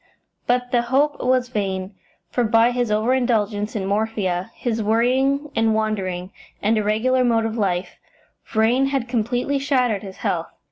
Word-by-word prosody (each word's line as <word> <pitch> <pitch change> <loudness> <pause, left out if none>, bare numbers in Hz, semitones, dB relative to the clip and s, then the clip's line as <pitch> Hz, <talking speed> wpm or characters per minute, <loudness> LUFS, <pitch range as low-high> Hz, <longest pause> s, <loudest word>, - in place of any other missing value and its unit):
But 245 0 +1
the 240 - +3
hope 275 +5 +1
was 255 0 +2
vain, 195 -4 -3 0.4
for 245 - +1
by 225 +2 +4
his 245 -1 -1
over 215 +4 +2
indulgence 220 -4 0
in 200 -3 -2
morphia, 200 -3 -1
his 230 -2 -2
worrying 260 +7 +1
and 225 -1 +2
wandering, 190 -4 -2 0.3
and 215 +2 +2
irregular 220 +5 +2
mode 230 -2 +2
of 225 0 -2
life, 185 -4 -2 0.4
Vrain 235 +5 +2
had 270 -3 -1
completely 245 +4 0
shattered 255 -7 +1
his 195 -3 -9
health. 165 -1 -1
225 Hz, 150 wpm, -22 LUFS, 210-250 Hz, 0.4 s, by